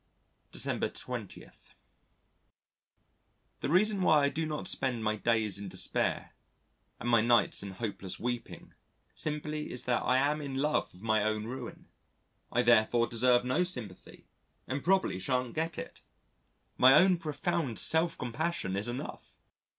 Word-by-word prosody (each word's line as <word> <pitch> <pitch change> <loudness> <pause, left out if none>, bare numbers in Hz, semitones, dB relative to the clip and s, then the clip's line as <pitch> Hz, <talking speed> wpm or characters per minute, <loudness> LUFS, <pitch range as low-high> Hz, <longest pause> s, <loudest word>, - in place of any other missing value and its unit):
December - - -1
20. - - -7 2.1
The - - -3
reason 195 +4 +3
why 155 -5 +4
I 140 - +3
do 160 +2 -2
not 150 -1 -3
spend 125 -4 -1
my 110 0 +1
days 110 -2 +1
in 100 - -6
despair - - -1 0.7
and 120 - -5
my 115 -2 +4
nights 115 -2 +3
in 100 - -6
hopeless 95 -3 -5
weeping 120 0 -5 0.4
simply 150 0 -3
is 125 - -3
that 125 -1 0
I 130 - +2
am 145 +3 +1
in 140 -2 -5
love 150 +3 0
with 90 - -17
my 110 -2 +2
own 110 0 -1
ruin. 125 +1 -7 0.7
I - - +2
therefore 115 +2 +4
deserve 120 +1 +2
no 130 +8 +1
sympathy, 125 - -7 0.4
and 135 +1 -3
probably 185 - +2
shan't 125 +2 -1
get 165 +1 -2
it: - - -8 0.8
my 130 +2 +8
own 185 -1 +5
profound 155 -4 -2
self 160 +1 +3
compassion 125 - -2
is 100 +3 -1
enough. 120 +2 -7
125 Hz, 145 wpm, -30 LUFS, 115-155 Hz, 2.1 s, my